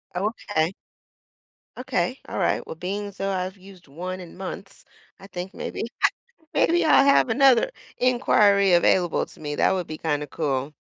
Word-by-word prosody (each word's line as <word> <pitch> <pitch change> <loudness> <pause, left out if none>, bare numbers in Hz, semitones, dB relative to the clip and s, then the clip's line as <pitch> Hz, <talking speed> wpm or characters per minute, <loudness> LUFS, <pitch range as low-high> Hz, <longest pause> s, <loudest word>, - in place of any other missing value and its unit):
Okay. 195 -3 -1 1.0
Okay, - - -2
alright, - - 0
well, - - -6
being 200 +4 -4
so 195 0 -4
I've 185 +1 -3
used 185 -3 -16
1 180 +6 -6
in 175 -2 -11
months, 195 +1 -8 0.3
I 195 - -12
think 180 0 -7
maybe - - -5 0.2
I - - +8 0.5
maybe 345 0 +3
I'll 275 -3 +6
have 280 -2 +4
another 265 - +4 0.3
inquiry 205 -6 +3
available 175 0 +3
to - - -18
me, 150 -1 -4
that - - +3
would 185 -3 -2
be 155 0 -6
kinda 150 -2 -1
cool. 140 -1 -2
190 Hz, 155 wpm, -24 LUFS, 170-205 Hz, 1.0 s, I